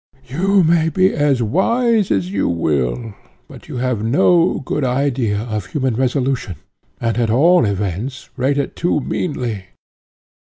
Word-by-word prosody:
You 185 +9 +2
may 165 0 +3
be 185 +4 +2
as 145 -5 +1
wise 220 - +1
as 180 +2 0
you - - 0
will, 80 - -1 0.3
but - - -14
you - - -6
have 125 -4 -1
no 170 +9 +3
good 145 +2 -2
idea 125 -4 0
of 110 -4 -4
human 130 +3 -1
resolution, 130 - -1 0.4
and, 115 -1 -1
at 115 -2 +1
all 165 +8 +4
events, 105 +7 -3
rate 140 +2 0
it 140 - -2
too 170 -3 0
meanly. 120 - -3
130 Hz, 145 wpm, -18 LUFS, 110-165 Hz, 0.4 s, all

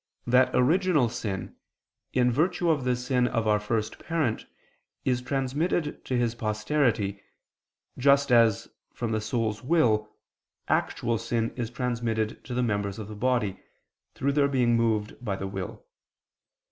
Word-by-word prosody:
that 125 +1 +4
original 155 0 +3
sin, 110 -5 -4 0.6
in 125 -1 +3
virtue 170 +5 +2
of 145 -5 0
the 125 -1 +2
sin 125 0 +1
of 115 -2 -1
our 105 -1 +3
first 105 0 -2
parent, 155 -9 -1 0.6
is 125 -1 +1
transmitted 140 +5 -1
to 130 - -1
his 120 -2 +1
posterity, 110 -2 0 0.8
just 140 +1 +4
as, 115 -4 +4 0.3
from 120 -2 -2
the 110 -1 0
soul's 110 -1 -1
will, 115 -8 +2 0.6
actual 115 -2 0
sin 115 0 -1
is 120 -3 -3
transmitted 115 -4 -2
to 125 - -6
the 125 - +1
members 100 -3 -1
of 110 -2 -7
the 105 - -7
body, 110 -4 0 0.6
through 140 +1 0
their 140 0 +3
being 125 -4 +2
moved 110 -1 0
by 100 -5 -1
the 95 - -5
will. 95 -1 -6
120 Hz, 145 wpm, -27 LUFS, 110-130 Hz, 0.8 s, that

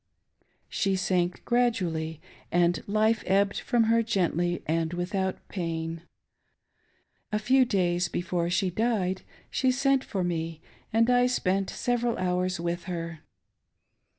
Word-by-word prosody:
She 195 -2 0
sank 180 -2 0
gradually, 175 -10 0 0.3
and 175 0 +2
life 215 +2 +2
ebbed 195 +1 +2
from 240 -2 +2
her 230 +1 +3
gently 175 -5 0
and 165 +1 0
without 190 +2 -2
pain. 165 -2 -3 1.3
A 210 - +1
few 255 +5 +4
days 180 -5 +1
before 175 -1 -1
she 185 +1 +1
died, 190 -3 0 0.3
she 260 - +2
sent 270 +1 +2
for 190 -3 -2
me, 165 -2 -2 0.3
and 230 +1 +3
I 245 0 +4
spent 195 -6 0
several 240 -1 0
hours 180 0 0
with 170 +1 -3
her. 170 -2 -5
185 Hz, 125 wpm, -27 LUFS, 175-225 Hz, 1.3 s, few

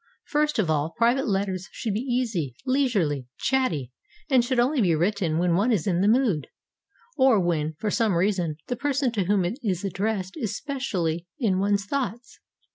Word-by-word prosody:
First 300 0 0
of 210 -6 +2
all, 155 +1 0
private 240 +3 +2
letters 195 -2 -1
should 220 - -3
be 210 - -1
easy, 230 - -1
leisurely, 205 - +1
chatty, 170 - 0 0.4
and 255 -3 +5
should 250 0 0
only 260 +3 +2
be 175 -5 +3
written 175 -1 0
when 175 0 +2
one 205 +8 +2
is 200 -9 +1
in 180 -2 +1
the 200 - +3
mood, 220 - +2 0.7
or 260 -6 +5
when, 160 -3 0
for 210 +3 -2
some 220 -6 +2
reason, 175 -4 0
the 245 - -2
person 275 0 0
to 205 -5 -1
whom 195 -1 +2
it 215 +10 -3
is 190 -6 -1
addressed 195 0 -2
is 215 -8 -2
specially 180 - -2
in 200 -7 +1
one's 200 0 +1
thoughts. 240 -1 -4
205 Hz, 180 wpm, -25 LUFS, 175-245 Hz, 0.7 s, and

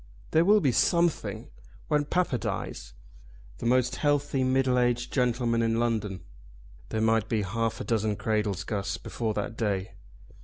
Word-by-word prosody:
"There 160 - +4
will 210 +2 +5
be 135 - +3
something 120 - +1 0.4
when 150 -1 +1
papa 160 -6 0
dies." - - -5 0.6
"The - - -2
most 125 +1 +2
healthy 145 -2 +1
middle 130 -1 +2
aged 120 0 0
gentleman 120 -2 +1
in 115 0 +1
London! 110 -6 -1 0.7
There 110 - -1
might 110 0 +2
be 110 -2 +1
half 115 +3 -2
a - - -3
dozen 110 -2 0
cradles, 105 -3 -1
Guss, 100 -3 -3
before 110 -3 -3
that 120 - -3
day. 105 -3 -1
115 Hz, 150 wpm, -28 LUFS, 110-130 Hz, 0.7 s, will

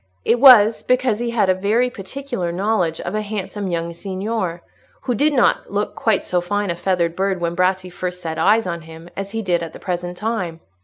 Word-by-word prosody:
It 240 - +3
was, 230 -5 +8
because 250 -3 +1
he 240 0 -2
had 230 -4 +1
a 185 - +4
very 215 +7 +1
particular 220 -3 -5
knowledge 180 -3 0
of - - -5
a 215 - 0
handsome 205 -1 -4
young 170 -1 -2
signor, 190 -1 -3 0.4
who 250 - -1
did 295 +7 +2
not 255 -4 +2
look 205 +1 -1
quite 220 -4 0
so 180 -1 0
fine 205 +2 -1
a - - -2
feathered 170 -2 0
bird 190 0 0
when 170 0 -2
Bratti 185 0 0
first 180 0 -4
set 160 -3 -4
eyes 225 +1 +4
on 170 -2 -3
him 165 +2 -12
as 195 0 -4
he 225 +2 -4
did 175 -3 +1
at 165 -1 -6
the - - -10
present 175 -1 -4
time. 190 -7 -3
190 Hz, 210 wpm, -20 LUFS, 175-220 Hz, 0.4 s, was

